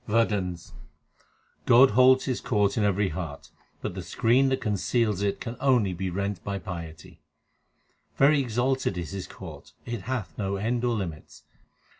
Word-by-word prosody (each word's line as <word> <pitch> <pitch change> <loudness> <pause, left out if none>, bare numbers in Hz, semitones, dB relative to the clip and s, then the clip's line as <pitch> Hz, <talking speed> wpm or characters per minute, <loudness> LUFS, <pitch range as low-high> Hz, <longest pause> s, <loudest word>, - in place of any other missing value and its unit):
WADHANS 105 -6 0 0.9
God 130 +3 +7
holds 130 +3 +5
His 130 -3 -2
court 105 -5 +1
in 110 - +1
every 100 -1 +1
heart, 80 -3 -7 0.3
but - - -3
the 95 - -5
screen 120 +9 +2
that 130 - 0
conceals 105 -1 0
it 100 -1 -1
can 115 - -5
only 125 -8 +2
be 95 +2 -3
rent 100 +2 -3
by 100 -1 -3
piety: 85 -5 -8 1.0
Very 145 +2 +5
exalted 125 -3 0
is 85 -1 -5
His 95 -2 -5
court; - - -11
It 120 -3 -4
hath 125 -6 -3
no 100 -1 -1
end 115 +5 -1
or 120 -1 +1
limits. 85 -7 -6
105 Hz, 155 wpm, -26 LUFS, 95-125 Hz, 1.0 s, God